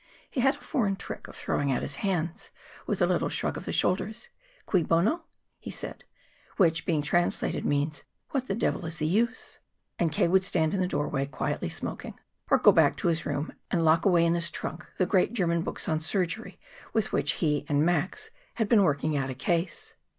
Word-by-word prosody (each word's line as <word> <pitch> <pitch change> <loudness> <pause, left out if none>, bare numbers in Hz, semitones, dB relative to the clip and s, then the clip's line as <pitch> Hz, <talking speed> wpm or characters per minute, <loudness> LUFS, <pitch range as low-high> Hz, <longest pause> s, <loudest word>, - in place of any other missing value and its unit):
He 260 - 0
had 270 +3 +4
a - - -16
foreign 210 -10 0
trick 195 - -7
of - - -12
throwing 140 -1 -1
out 130 - 0
his 140 - -4
hands, 175 -3 -2 0.4
with - - +1
a - - +6
little - - +1
shrug - - -1
of - - -6
the - - -3
shoulders. 215 +5 0 0.4
"Cui 185 - +2
bono?" 195 - +1 0.3
he - - -8
said - - -7 0.5
which, 170 -1 +3
being 155 -5 +1
translated, 175 +4 0
means: 145 +1 0 0.3
"What 260 -2 -1
the 195 - -1
devil's 170 -6 -1
the 155 - -1
use!" 230 +9 0 0.4
And 170 -2 +2
K. 155 - +2
would 190 +2 +4
stand 160 -4 +1
in 195 - 0
the 180 - +1
doorway, 145 -4 -1
quietly 140 - -2
smoking, - - -5 0.3
or - - +6
go - - +7
back - - +4
to - - +1
his 165 -1 0
room 145 +3 -2 0.2
and 165 -2 +1
lock 160 +1 +4
away 175 -4 +4
in 170 - +3
his 170 0 +3
trunk 160 0 -6
the 185 - +3
great 190 +4 +2
German 170 -6 +1
books - - -3
on 155 -2 +1
surgery 175 +5 -2 0.4
with 220 -2 +1
which - - +1
he 150 -3 0
and 145 +1 +3
Max 175 - -1 0.2
had 225 -3 0
been 215 -1 +5
working 150 -3 +1
out 135 -2 -1
a 130 - -4
case. 170 +6 -2
170 Hz, 200 wpm, -28 LUFS, 155-195 Hz, 0.5 s, go